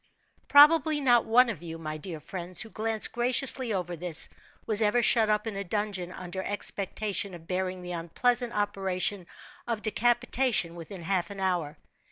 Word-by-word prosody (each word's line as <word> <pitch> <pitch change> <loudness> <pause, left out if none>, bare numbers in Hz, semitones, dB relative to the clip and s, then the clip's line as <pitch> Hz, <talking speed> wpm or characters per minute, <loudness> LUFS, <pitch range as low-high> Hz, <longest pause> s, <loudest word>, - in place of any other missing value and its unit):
Probably 300 +1 +6
not 245 -4 +3
one 245 +3 +5
of 215 -9 -5
you; 165 -1 -7
my 155 -1 -6
dear 160 0 -7
friends, 180 +3 -3
who 220 - -8
glance 220 0 +1
graciously 250 0 +1
over 180 -3 -3
this, 170 -1 +1 0.4
was 215 0 +4
ever 220 +3 +2
shut 225 -1 +3
up 210 0 +1
in 220 -3 -4
a 200 - -3
dungeon 200 -2 -3
under 185 +1 -6
expectation 200 -1 -2
of 165 -1 -13
bearing 185 0 -3
the 180 - -6
unpleasant 235 +9 -1
operation 195 -2 -2 0.4
of 230 -3 -3
decapitation 240 -3 +1
within 175 +2 -9
half 185 +1 -1
an 200 -1 -8
hour. 175 -6 -1
200 Hz, 165 wpm, -28 LUFS, 180-230 Hz, 0.4 s, Probably